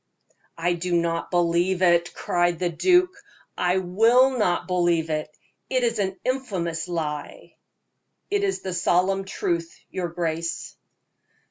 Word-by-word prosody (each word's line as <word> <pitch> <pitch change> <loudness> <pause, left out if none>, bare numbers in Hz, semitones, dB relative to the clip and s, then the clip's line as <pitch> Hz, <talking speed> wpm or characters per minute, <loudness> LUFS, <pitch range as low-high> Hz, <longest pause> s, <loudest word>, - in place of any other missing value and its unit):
"I 175 +1 +1
do 175 +1 -2
not 170 0 0
believe 175 +1 +1
it!" 175 -1 +3
cried 175 -1 0
the 175 0 -1
duke. 360 - +3 0.4
"I 180 +1 +1
will 225 +8 +4
not 180 -7 +1
believe 175 -3 +1
it! 155 0 -2 0.4
It 255 -1 +1
is 230 -2 0
an 190 -1 -2
infamous 185 -11 -2
lie." 150 -4 -5 0.8
"It 405 0 +1
is 390 -1 -1
the 190 - -4
solemn 185 +2 +1
truth, 170 -3 -3
your 180 -2 -2
grace." 165 -1 -3
175 Hz, 130 wpm, -24 LUFS, 170-195 Hz, 0.8 s, will